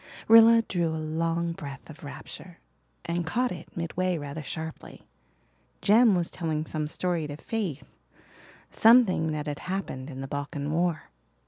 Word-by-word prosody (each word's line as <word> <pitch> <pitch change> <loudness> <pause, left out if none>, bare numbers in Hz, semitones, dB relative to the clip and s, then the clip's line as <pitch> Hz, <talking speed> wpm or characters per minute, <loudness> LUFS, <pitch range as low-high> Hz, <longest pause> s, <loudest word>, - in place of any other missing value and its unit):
Rilla 230 +1 +8
drew 175 -5 -1
a 160 0 -2
long 165 +2 -1
breath 140 -5 -8
of 155 0 -12
rapture 165 +4 -10 0.5
and 170 +1 -1
caught 245 +10 0
it 170 -1 -9
midway 175 +2 -1
rather 145 +1 -6
sharply. 160 +2 -6 0.8
Jem 215 0 +6
was 175 -2 -1
telling 160 -3 -2
some 155 -1 -3
story 170 0 -2
to 145 0 -7
Faith 170 - -3 0.9
something 220 -9 +5
that 150 -1 -3
had 145 -2 -4
happened 180 -8 -4
in 135 -2 -7
the 135 - -5
Balkan 145 +1 -4
War. 170 0 -1
165 Hz, 145 wpm, -27 LUFS, 150-185 Hz, 0.9 s, Rilla